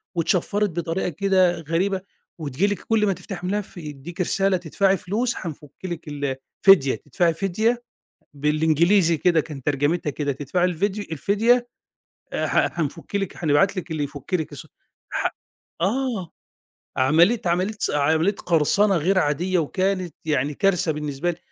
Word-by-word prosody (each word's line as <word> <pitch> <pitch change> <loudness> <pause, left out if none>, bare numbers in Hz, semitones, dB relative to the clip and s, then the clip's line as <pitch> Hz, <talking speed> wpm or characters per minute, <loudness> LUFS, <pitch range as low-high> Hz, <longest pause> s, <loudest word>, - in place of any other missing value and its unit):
واتشفّرت 195 +5 +1
بطريقة 170 +2 -2
كده 185 0 +2
غريبة 185 +5 0 0.4
وتيجي 155 +5 0
لِك 205 -1 -2
كُلّ 220 -2 +1
ما 200 - +2
تفتحي 180 -1 -7
ملف 205 0 -3
يديكِ 155 +2 -7
رسالة 195 +1 +2
تدفعي 190 +3 +1
فلوس 225 +8 -1
هنفُكّ 150 -4 -7
لك 170 -3 -5
ال 145 -2 -2 0.3
فديه 170 -9 +6
تدفعي 165 +4 0
فديه 215 +7 0 0.5
بالإنجليزي 160 +4 +3
كده، 170 0 +3
كان 145 -3 -9
ترجمتها 145 +4 0
كده 145 0 -2
تدفعي 145 +6 0
الفيديو 195 +4 -1
الفديه، 225 - +2 0.7
آآ، - - -1
ح 175 - +1
هنفُكّ 165 +5 -3
لك 195 -3 -4
هنبعت 160 +7 +3
لك 185 -1 -5
اللي 155 -2 -1
يفُكّ 140 +4 -6
لك 160 -5 -1
س - - -9 0.4
ح - - 0 0.5
آه، 215 -1 -1 0.7
عملية، 165 - +4
عملية، 180 +5 0 0.2
عملية 160 +6 +2
قرصنة 185 +4 +2
غير 185 +5 +2
عادية 175 +4 +1
وكانت 185 +2 -1
يعني 150 -2 0
كارثة 180 0 +2
بالنسبة 150 +2 -2
لي، 165 - -10
175 Hz, 140 wpm, -23 LUFS, 150-195 Hz, 0.7 s, فديه